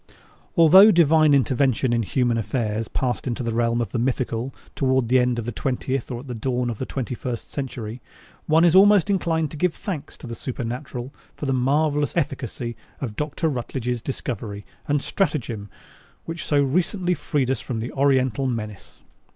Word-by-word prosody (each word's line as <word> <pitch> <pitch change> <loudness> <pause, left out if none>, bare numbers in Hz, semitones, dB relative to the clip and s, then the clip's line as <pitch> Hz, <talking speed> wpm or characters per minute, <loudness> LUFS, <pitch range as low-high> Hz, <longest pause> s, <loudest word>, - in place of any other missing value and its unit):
_ - - -23 0.4
Although 185 +6 +9
Divine 160 -4 +5
intervention 130 -1 +2
in 115 - +2
human 120 +2 +1
affairs 110 -1 -2
passed 125 0 -2
into 125 0 -2
the 115 -1 -2
realm 120 0 +1
of 115 - -3
the 120 - -1
mythical 120 0 -1 0.2
toward 130 -3 +1
the 130 +1 +5
end 125 -1 +1
of 115 - -3
the 120 - -3
twentieth 130 +2 -2
or 120 -2 -4
at 140 - -13
the 125 - -4
dawn 125 +1 -1
of 110 - -7
the 130 - -3
twenty 130 -2 -3
first 120 -1 -5
century, 120 -4 -5 0.5
one 160 +2 +5
is 170 0 +4
almost 205 0 +6
inclined 165 -5 0
to 155 - -7
give 180 +2 +1
thanks 180 -9 -6
to - - -11
the 120 - -6
Supernatural 125 +2 -5 0.2
for - - -5
the 135 - +1
marvelous 145 +4 +1
efficacy 125 -5 -2 0.2
of 115 -6 -4
Dr. 150 +5 -2
Rutledge's 125 -3 -2
discovery 110 -6 -5 0.2
and 145 -1 +1
stratagem 125 - -2 0.6
which 165 0 -5
so 145 - +2
recently 180 +6 +1
freed 140 -6 -1
us 135 - -1
from 120 -4 -4
the 115 +3 -4
Oriental 135 -2 +2
menace. 105 -5 -6
130 Hz, 180 wpm, -23 LUFS, 120-150 Hz, 0.6 s, Although